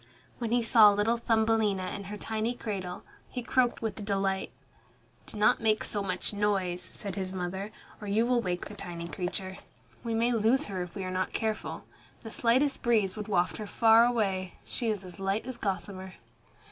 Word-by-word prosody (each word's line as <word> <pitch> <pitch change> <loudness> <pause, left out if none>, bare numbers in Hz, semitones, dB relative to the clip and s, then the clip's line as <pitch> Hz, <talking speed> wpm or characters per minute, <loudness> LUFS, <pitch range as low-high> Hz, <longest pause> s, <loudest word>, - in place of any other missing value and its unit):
When 230 -2 -2
he 240 0 +3
saw 225 -2 +8
little 205 +3 +2
Thumbelina 220 -4 +1
in 200 - -6
her 205 +2 -6
tiny 220 +3 -2
cradle, 190 -6 -5 0.3
he 250 - -5
croaked 245 -1 +1
with 220 -1 -3
delight. 195 -1 0 0.8
"Do - - -9
not 210 - +4
make 215 -1 +2
so 205 - -1
much 185 +1 -1
noise," 195 -4 0
said 200 -3 -6
his 190 0 -4
mother, 190 +3 -4 0.3
"or 210 - -6
you 215 +3 +2
will 245 -1 +2
wake 180 -3 -2
the - - -8
tiny 175 -4 -6
creature. 185 +3 -4 0.5
We 230 -2 -1
may 235 +2 +2
lose 230 +3 +3
her 190 -3 -4
if 180 -1 -6
we 195 - -3
are 185 - -3
not 185 0 -1
careful. 220 -1 -2 0.4
The 225 - -7
slightest 260 +6 +2
breeze 215 -6 +2
would 210 -1 -5
waft 180 -4 +1
her 215 - -5
far 225 +2 +6
away. 195 -7 0
She 235 -3 -2
is 210 -3 -1
as 180 +1 -10
light 195 +3 -1
as 260 -1 -5
gossamer." 190 -2 -4
210 Hz, 185 wpm, -29 LUFS, 190-225 Hz, 0.8 s, saw